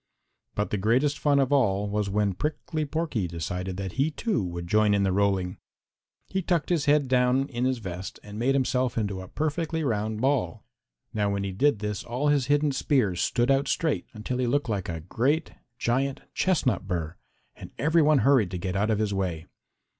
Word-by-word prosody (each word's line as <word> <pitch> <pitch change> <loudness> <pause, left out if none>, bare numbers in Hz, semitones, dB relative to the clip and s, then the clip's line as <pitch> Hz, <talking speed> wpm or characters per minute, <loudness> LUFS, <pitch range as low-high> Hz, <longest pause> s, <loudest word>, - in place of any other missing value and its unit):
But 105 - -1
the 105 - 0
greatest 130 +8 +2
fun 145 -1 +3
of 135 0 +2
all 105 -7 +2
was 105 0 -1
when 100 0 +1
Prickly 155 - -3
Porky 150 - -2
decided 90 +2 -4
that 95 -1 -4
he, 135 - +1
too, 195 - -1
would 85 -1 -5
join 105 +3 +3
in 100 - +2
the 95 - +2
rolling. 95 -2 +1 0.7
He 190 - -1
tucked 170 -3 0
his 170 -5 +1
head 145 -1 +3
down 125 +1 +2
in 125 -1 -2
his 130 0 +1
vest 95 -4 -7
and 105 +1 -8
made 135 +4 +2
himself 130 -2 0
into 100 -4 -1
a 95 - -9
perfectly 160 - -2
round 110 -4 -1
ball. 130 -4 0 0.5
Now 105 -2 +1
when 100 0 -1
he 100 - -2
did 140 +8 +2
this, 105 -1 -3
all 125 +5 -1
his 145 -3 +2
hidden 145 0 +3
spears 125 - +1
stood 120 +3 +2
out 135 +1 +2
straight, 160 -3 0
until 120 +3 -4
he 125 - +1
looked 140 0 0
like 100 -5 -2
a 80 -1 -4
great, 130 - 0 0.3
giant, 130 +4 0
chestnut 130 - +1
burr, 85 -3 -3 0.4
and - - -10
every 160 +3 +3
one 150 0 +5
hurried 130 -9 +4
to 90 - -4
get 90 +1 -3
out 105 +3 +1
of 110 - +2
his 105 -1 0
way. 90 -5 -2
120 Hz, 200 wpm, -27 LUFS, 100-145 Hz, 0.7 s, one